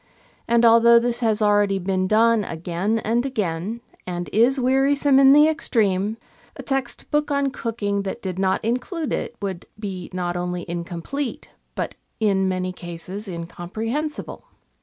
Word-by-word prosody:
And, 235 Hz, 0 st, +4 dB
although 230 Hz, +1 st, +7 dB
this 240 Hz, 0 st, +1 dB
has 220 Hz, -3 st, +1 dB
already 205 Hz, -1 st, +3 dB
been 185 Hz, 0 st, -1 dB
done 225 Hz, +1 st, +4 dB
again 175 Hz, +6 st, -2 dB
and 235 Hz, +3 st, +1 dB
again, 215 Hz, -3 st, -3 dB, 0.3 s
and 175 Hz, -1 st, -4 dB
is 245 Hz, +5 st, +4 dB
wearisome 270 Hz, +2 st, +3 dB
in 270 Hz, 0 st, +7 dB
the 295 Hz, +2 st, +7 dB
extreme, 215 Hz, -, 0 dB, 0.4 s
a -, -, -8 dB
text 270 Hz, -1 st, -3 dB
book 295 Hz, 0 st, +1 dB
on 280 Hz, -1 st, +1 dB
cooking 205 Hz, -5 st, -2 dB
that 195 Hz, +4 st, -5 dB
did 185 Hz, -1 st, -4 dB
not 190 Hz, +2 st, +1 dB
include 260 Hz, -, -2 dB
it -, -, -3 dB
would 190 Hz, -3 st, -4 dB
be 195 Hz, -4 st, -6 dB
not 175 Hz, -1 st, -2 dB
only 180 Hz, 0 st, -3 dB
incomplete, 175 Hz, +11 st, -4 dB, 0.3 s
but -, -, -3 dB, 0.3 s
in 195 Hz, -3 st, +2 dB
many 185 Hz, 0 st, -2 dB
cases 180 Hz, +4 st, -7 dB
incomprehensible. 215 Hz, -, -5 dB
215 Hz, 145 wpm, -23 LUFS, 185-245 Hz, 0.4 s, although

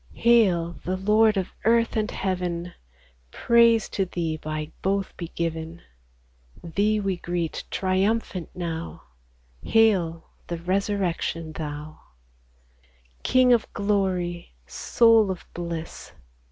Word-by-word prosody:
69 -, -, -14 dB
Hail, 185 Hz, -8 st, +3 dB
the 185 Hz, +1 st, -2 dB
Lord 210 Hz, +2 st, +3 dB
of 190 Hz, -, -2 dB
earth 230 Hz, +1 st, +3 dB
and 215 Hz, -1 st, 0 dB
heaven! 180 Hz, -2 st, -3 dB, 0.6 s
Praise 230 Hz, -, +4 dB
to 195 Hz, -, 0 dB
Thee 170 Hz, -3 st, -3 dB
by 155 Hz, 0 st, -5 dB
both 195 Hz, 0 st, -1 dB
be 170 Hz, -, -6 dB
given! 165 Hz, 0 st, -4 dB, 0.8 s
Thee 205 Hz, +5 st, +1 dB
we 195 Hz, -3 st, -1 dB
greet 175 Hz, -2 st, -3 dB
triumphant 190 Hz, -1 st, 0 dB
now, 170 Hz, -2 st, -5 dB, 0.6 s
Hail, 185 Hz, -, +2 dB, 0.2 s
the 170 Hz, -, -3 dB
Resurrection 180 Hz, -3 st, -1 dB
Thou! 150 Hz, 0 st, -6 dB, 1.2 s
King 255 Hz, -1 st, +4 dB
of 235 Hz, -, +1 dB
glory, 185 Hz, -, -1 dB
Soul 225 Hz, -, +3 dB
of 185 Hz, -2 st, -5 dB
bliss 170 Hz, -2 st, -6 dB
185 Hz, 110 wpm, -25 LUFS, 170-210 Hz, 1.2 s, Praise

